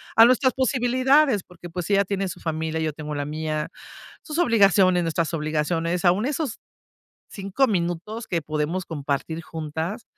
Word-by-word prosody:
a 225 - +9
nuestras 255 +2 +3
posibilidades, 255 -1 +3
porque 175 -1 -12
pues 175 +1 -5
ella 200 0 +3
tiene 195 0 -2
su 180 - -8
familia, 160 -1 -2
yo 160 -1 -1
tengo 150 0 -6
la 145 0 -2
mía, 155 0 -3 0.5
sus 305 0 -6
obligaciones, 195 - +4
nuestras 165 0 -1
obligaciones. 165 +3 -1
Aún 185 +6 +3
esos 285 -3 -2 0.7
5, 200 +7 0
minutos 185 +4 -2
que 170 -2 -1
podemos 155 +4 -2
compartir 150 +1 -3
juntas 160 +6 -5
175 Hz, 145 wpm, -24 LUFS, 160-215 Hz, 0.7 s, a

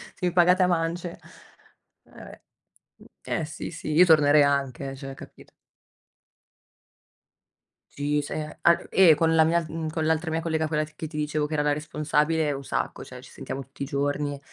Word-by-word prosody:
se - - -26
mi 180 - +1
pagate 180 +1 +4
a 180 - +3
mance, 170 0 -2 0.9
eh - - -25
va - - -11
beh - - -13 0.6
uhm, - - -17 0.3
eh, - - -2
sì, 155 - -7
sì, 155 -2 -6
io 175 +4 +6
tornerei 150 -2 +5
anche 140 -1 -1
eh, 135 - -8
cioè, 135 0 -8
capito? - - -14 2.4
Sì 145 +1 -1
se 155 +1 -6
an 170 0 +3
eh, 185 -4 +6
con 165 +2 +2
la 160 - +6
mia, 170 +1 +1
uhm, 160 0 -4
con 155 0 -2
l'altra 160 +1 0
mia 165 - -1
collega, 160 -1 -1
quella 155 0 0
che 155 +1 -8
ti 155 - -13
dicevo 150 0 -1
che 150 - -6
era 150 - +1
la 145 0 +1
responsabile, 150 +1 0
un 140 -1 -5
sacco. - - -3
Cioè, - - -11
ci - - -15
sentiamo 135 - -6
tutti 135 +2 -9
i - - -2
giorni. 145 0 -2
155 Hz, 190 wpm, -25 LUFS, 145-165 Hz, 2.4 s, io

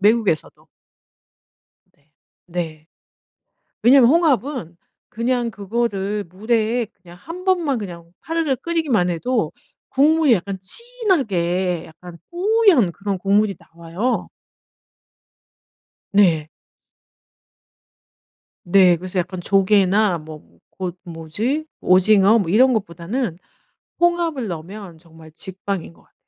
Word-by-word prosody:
외국에서도. 210 -5 +1 1.3
네. 145 +1 -37 0.4
네. 160 -3 -5 1.0
왜냐하면 255 0 +6
홍합은 270 - +1 0.3
그냥 240 +1 -1
그거를 205 -1 -2
물에 220 +5 -1
그냥 175 -2 -16
1 355 +4 -9
번만 340 -9 +1
그냥 170 -4 -9
파르르 325 -5 -1
끓이기만 275 - 0
해도 175 -1 -1 0.4
국물이 300 -1 +4
약간 190 0 -4
진하게 190 - -1
약간 170 +1 -13
뿌연 365 - +3
그런 200 +1 -4
국물이 200 +1 +1
나와요. 170 +9 -4 1.8
네. 170 -7 +3 2.2
네 180 -1 +5
그래서 185 +2 -5
약간 180 +1 -3
조개나 195 0 +3
뭐 155 0 -11 0.4
곳 185 -1 -4
뭐지? 180 - -3 0.2
오징어? 195 +3 +5
뭐 180 - -3
이런 255 +6 +5
것보다는 195 0 -3 0.6
홍합을 340 -7 +1
넣으면 175 +1 -8
정말 160 -1 -17
직방인 190 +1 -6
것 - - -23
같아요 - - -33
200 Hz, 215 characters per minute, -20 LUFS, 175-255 Hz, 2.2 s, 왜냐하면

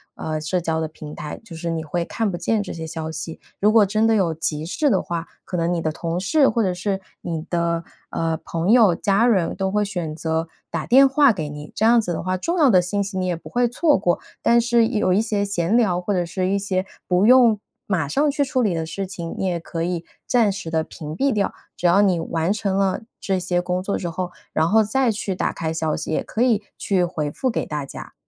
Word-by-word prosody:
呃， 155 -1 -3
社 180 +4 0
交 160 -1 -1
的 160 - -1
平 155 -1 -10
台， 150 - -6
就 180 -7 -10
是 170 +1 -4
你 165 -1 -2
会 170 +2 -2
看 225 -3 -1
不 175 - -3
见 210 +5 0
这 200 - -7
些 160 -1 -6
消 160 0 -5
息。 160 0 -6 0.2
如 210 +2 +4
果 215 -2 +6
真 215 +3 +1
的 225 - +4
有 180 -6 +2
急 155 -1 -3
事 290 - +1
的 190 - +2
话， 170 0 -4 0.2
可 180 - -5
能 170 0 +1
你 170 -2 0
的 155 - -1
同 165 +2 -3
事 275 +8 +3
或 230 - +1
者 185 -3 +1
是 190 +2 -2 0.2
你 160 -2 -4
的， 170 -1 0 0.3
呃， 165 -1 -1
朋 170 +4 -1
友、 225 -7 +6
家 200 +6 +2
人 190 -8 +2
都 190 0 -1
会 210 +1 +2
选 175 -6 -4
择 160 0 -1 0.2
打 165 -2 -2
电 270 +3 +7
话 275 -1 +5
给 160 -7 -3
你。 150 0 -9
这 - - -1
样 235 +1 +6
子 180 - -4
的 - - -3
话， 185 0 -1
重 340 - -2
要 290 - +6
的 185 -6 +6
信 200 +3 -1
息 195 -1 -5
你 185 - 0
也 175 - 0
不 165 - -11
会 245 0 +2
错 295 +5 +2
过。 175 -1 +1 0.2
但 235 0 +5
是 235 -1 +3
有 210 -6 +1
一 195 - +3
些 210 -2 0
闲 195 0 0
聊， 195 -7 +3
或 200 +3 -1
者 180 -2 +1
是 185 +2 -2
一 200 - +2
些 190 -1 -1 0.2
不 180 +2 +3
用 235 -3 +6 0.3
马 175 -7 0
上 290 - +2
去 285 0 +1
处 260 -1 0
理 205 -7 +1
的 160 -1 -2
事 195 +4 -4
情， 175 -4 -6
你 - - -1
也 175 -2 -1
可 165 0 -5
以 170 -1 -2 0.2
暂时 205 -8 +1
地 160 0 0
屏 155 -1 -8
蔽 275 +1 +2
掉。 200 -2 0 0.2
只 175 - +1
要 190 +4 +5
你 185 -4 +2
完 165 +3 0
成 200 -2 -1
了 195 +1 +1 0.2
这 190 -1 -1
些 175 0 0
工 180 +1 -1
作 200 - -1
之 175 - -4
后， 180 +1 -4 0.2
然 160 +1 +2
后 220 +1 +5
再 240 +3 +1
去 200 -3 -3
打 - - 0
开 160 -1 -3
消 160 -1 -1
息， - - -5
也 - - 0
可 220 - -3
以 230 -5 +3 0.2
去 190 -3 +1
回 160 -4 -2
复 260 - -1
给 - - -2
大 150 -2 -3
家， - - -10
185 Hz, 270 characters per minute, -22 LUFS, 165-215 Hz, 0.3 s, 电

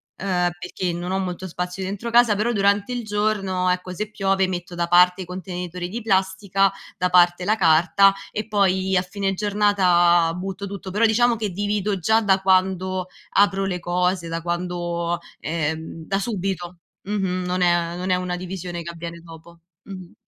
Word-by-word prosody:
ehm, 180 -2 0
perché 180 0 -3
non 175 +2 -4
ho 190 - 0
molto 185 0 -4
spazio 180 +3 -4
dentro 200 +5 -4
casa, 235 -3 +5
però 235 +3 0
durante 200 +3 +1
il 240 -1 -3
giorno, 205 -3 0
ecco, 180 0 -2
se 210 +3 -4
piove 195 -2 +1
metto 175 -1 -5
da 170 0 -1
parte 180 +1 +5
i - - -11
contenitori 180 -1 -6
di 230 +4 -5
plastica, 195 -1 +1 0.3
da 180 0 +1
parte 175 0 +4
la 215 +2 +3
carta 185 +3 +5 0.2
e 215 +1 -4
poi 190 -2 +1
a 180 - +4
fine 195 +1 -2
giornata 185 -5 +3
butto 195 +2 -5
tutto. 195 -1 -7
Però 220 +4 +3
diciamo 235 +2 +3
che 215 -2 -3
divido 205 +1 -1
già 220 +7 +3
da 195 -2 +3
quando 185 -1 +1 0.2
apro 195 -1 +3
le 180 -2 -2
cose, 180 0 0
da 165 0 -3
quando 175 0 -2 0.2
ehm, 160 0 -3
da 195 - -1
subito. 190 -4 -3 0.3
Mh-mh, 190 -3 -1
non 180 +1 -1
è 175 -1 +2
non 185 +1 -4
è - - +4
una 180 -1 -3
divisione 180 -1 -6
che 170 - -6
avviene 170 0 -8
dopo. 165 0 -14 0.2
Mh-mh. 185 -3 -10
185 Hz, 175 wpm, -22 LUFS, 175-200 Hz, 0.3 s, casa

